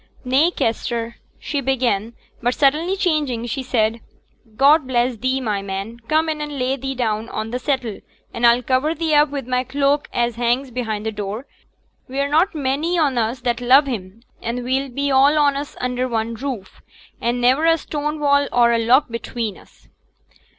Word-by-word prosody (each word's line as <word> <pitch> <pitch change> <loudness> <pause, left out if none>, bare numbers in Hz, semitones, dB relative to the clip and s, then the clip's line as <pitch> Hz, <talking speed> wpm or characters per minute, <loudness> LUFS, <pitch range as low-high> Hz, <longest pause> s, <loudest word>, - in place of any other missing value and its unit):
'Nay, 270 +6 +4
Kester 230 -4 -2
' - - -37
she 285 - -1
began; 240 -5 0 0.3
but 245 +1 0
suddenly 310 +7 +2
changing, 300 - 0
she 255 +3 -3
said, 230 -3 0 0.6
'God 280 +3 +5
bless 245 -1 +1
thee, 260 +4 0
my 210 -6 -2
man; 195 +4 -5
come 315 +1 +2
in 310 -1 -2
and 295 -1 -5
lay 255 +1 0
thee 270 0 -4
down 225 -2 -1
on 220 +1 -4
t' 250 - -2
settle, 255 -6 -2 0.3
and 235 - -5
I'll 235 +1 +4
cover 265 +6 +1
thee 325 -1 -1
up 295 0 +5
wi' 285 -1 -3
my 250 0 -1
cloak 280 +2 0
as 240 -1 -1
hangs 245 +2 0
behind 220 -3 -3
t' 220 - -1
door. 210 +4 -5 0.6
We're 275 +2 -1
not 325 +5 +2
many 300 +5 0
on 280 -7 +2
us 235 +3 -1
that 240 -1 -1
love 260 +4 +6
him, 220 -4 -6 0.2
an' 235 +2 -3
we'll 265 +2 -1
be 280 +3 -1
all 275 +3 +5
on 290 -2 +3
us 285 +1 -5
under 250 0 -1
one 230 -1 -2
roof, 235 -5 -6 0.4
an' 240 +1 0
niver 260 +6 +3
a 330 0 +5
stone 300 0 -4
wall 285 -1 +3
or 240 -1 +4
a 230 - +2
lock 250 +5 +4
betwixt 230 -3 -4
us.' - - -22
255 Hz, 185 wpm, -21 LUFS, 235-285 Hz, 0.6 s, love